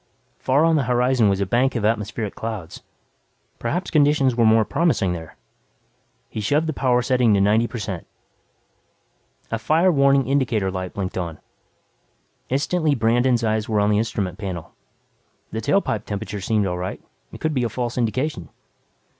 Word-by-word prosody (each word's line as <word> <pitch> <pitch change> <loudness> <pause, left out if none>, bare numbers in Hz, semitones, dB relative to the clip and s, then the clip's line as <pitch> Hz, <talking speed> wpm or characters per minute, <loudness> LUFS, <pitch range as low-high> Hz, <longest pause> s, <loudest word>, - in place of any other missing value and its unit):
Far 140 +5 +2
on 165 -1 +3
the 140 - 0
horizon 125 -2 +3
was 100 -1 +1
a - - +1
bank 125 +6 +1
of 110 -3 -1
atmospheric 105 -1 -1
clouds. 110 -7 -6 0.8
Perhaps 175 +10 -2
conditions 145 -4 +3
were 115 -2 +4
more 110 0 +4
promising 155 - +1
there. 80 -2 -8 0.9
He 110 - -5
shoved 145 +9 +1
the 160 - -2
power 125 -3 +1
setting 125 -4 +3
to - - +2
90 105 +4 +3
per 120 - -7
cent. 95 -5 -5 1.4
A 115 - -1
fire 160 +11 +3
warning 140 -3 +3
indicator 120 -8 +1
light 95 -1 -5
blinked 95 -2 -3
on. 85 -3 -4 1.1
Instantly 150 +3 +1
Brandon's 120 +1 +2
eyes 110 +1 0
were 105 -2 +1
on 105 +1 +2
the 105 - +3
instrument 105 -4 -2
panel. 95 -5 -6 0.8
The 110 - -3
tailpipe 110 - 0
temperature 105 0 -5
seemed 105 +1 +1
all 90 -1 -2
right. 90 +1 -4 0.3
It - - -10
could 155 -1 -1
be 130 -3 0
a 120 - 0
false 120 +1 -3
indication. 125 - -2
115 Hz, 165 wpm, -22 LUFS, 105-135 Hz, 1.4 s, were